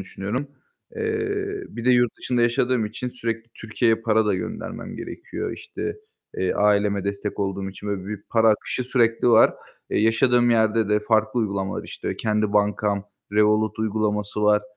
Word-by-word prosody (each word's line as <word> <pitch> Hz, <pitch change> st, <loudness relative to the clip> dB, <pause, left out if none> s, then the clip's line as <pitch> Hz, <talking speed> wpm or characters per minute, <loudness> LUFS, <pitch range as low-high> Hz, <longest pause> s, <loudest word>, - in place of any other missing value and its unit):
düşünüyorum. 110 Hz, +9 st, -4 dB, 0.5 s
Eee, 410 Hz, -2 st, -2 dB
bir 115 Hz, -, -7 dB
de 125 Hz, -, +4 dB
yurt 120 Hz, -2 st, +3 dB
dışında 120 Hz, -2 st, 0 dB
yaşadığım 120 Hz, 0 st, +2 dB
için 125 Hz, +4 st, -5 dB
sürekli 115 Hz, -2 st, -4 dB
Türkiye'ye 115 Hz, +1 st, +1 dB
para 110 Hz, -1 st, +1 dB
da 105 Hz, -, +2 dB
göndermem 90 Hz, -2 st, -5 dB
gerekiyor. -, -, -5 dB
İşte, -, -, -6 dB, 0.4 s
eee, 95 Hz, -1 st, 0 dB
aileme 100 Hz, -1 st, +2 dB
destek 100 Hz, +1 st, -3 dB
olduğum 95 Hz, 0 st, -2 dB
için 105 Hz, +2 st, -8 dB
ve 100 Hz, -2 st, -3 dB
büyük 105 Hz, 0 st, -7 dB
para 115 Hz, -1 st, +4 dB
akışı 110 Hz, +3 st, 0 dB
sürekli 120 Hz, -1 st, +2 dB
var. 115 Hz, -1 st, +6 dB, 0.4 s
Eee, -, -, +1 dB
yaşadığım 120 Hz, +2 st, +3 dB
yerde 110 Hz, -1 st, +2 dB
de 105 Hz, 0 st, +2 dB
farklı 110 Hz, +2 st, +1 dB
uygulamalar, 100 Hz, -3 st, -2 dB
işte, -, -, -5 dB
kendi 105 Hz, -1 st, 0 dB
bankam 105 Hz, -1 st, +1 dB, 0.3 s
"Revolut" 105 Hz, +1 st, +2 dB
uygulaması 105 Hz, -1 st, -1 dB
var. 105 Hz, 0 st, +4 dB
110 Hz, 155 wpm, -23 LUFS, 105-120 Hz, 0.5 s, var